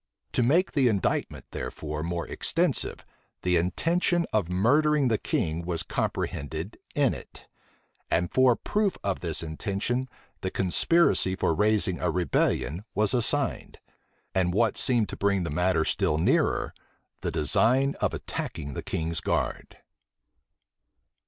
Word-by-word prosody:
To - - +1
make 160 +10 +3
the 135 -4 +3
indictment, 100 -5 -1
therefore, 75 0 -5
more 85 +1 -3
extensive, - - 0 0.4
the 90 -1 +2
intention 170 - +1
of 105 -6 +1
murdering 140 +9 +3
the 110 - +1
king 80 +2 -1
was 85 -1 -3
comprehended 80 +7 -3 0.2
in 140 -4 +3
it; - - -11 0.6
and 85 +1 0
for 130 -2 +5
proof 205 - -1
of 100 -1 -1
this 85 -2 -1
intention 100 +10 -2 0.3
the 95 - -3
conspiracy 95 - +3
for 85 - +1
raising 105 -1 +2
a - - 0
rebellion 90 -1 0
was 105 +2 +3
assigned; 130 +3 +1 0.6
and, 90 -1 +1
what 115 -1 +2
seemed 120 -5 +1
to - - -5
bring 100 -2 +1
the 85 - -3
matter 90 0 +1
still 75 - +1
nearer, 80 - +1 0.5
the - - -1
design 125 - +2
of - - +1
attacking 70 -4 -5
the - - -4
king's 80 0 -3
guards. - - -2
100 Hz, 135 wpm, -27 LUFS, 85-125 Hz, 0.6 s, for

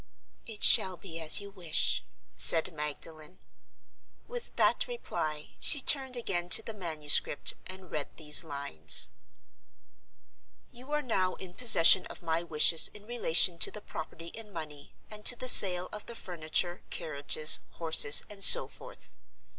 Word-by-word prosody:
"It 220 -2 -9
shall 185 -1 +5
be 165 -1 -11
as 160 -1 +2
you 200 0 -12
wish," 175 -5 -3 0.3
said 165 +2 +2
Magdalen. 155 +3 -9 0.9
With 485 0 -11
that - - -1
reply, 155 - -8
she 290 - +2
turned 265 -1 +1
again 175 -7 -5
to 220 - -11
the 225 - -10
manuscript 155 -7 -1
and 185 -1 -11
read 150 -2 -6
these 150 +1 0
lines: 140 - -2 0.8
".... - - -44
You 255 +4 -15
are 300 0 -4
now 185 -7 -4
in 180 -2 -13
possession 190 -5 +5
of - - -15
my 165 0 -4
wishes 165 0 +2
in 210 0 -16
relation 180 -7 +1
to - - +3
the 210 - -12
property 165 -3 -12
in 220 +1 -14
money, 155 -5 -12 0.2
and 210 0 -11
to 245 - +3
the 255 - -8
sale 185 -6 +6
of 210 - -12
the 235 - -11
furniture, 175 -1 -5
carriages, 155 0 -1
horses, 160 -3 +3
and 200 -1 -7
so - - +8
forth. - - -16
175 Hz, 150 wpm, -26 LUFS, 155-210 Hz, 0.9 s, so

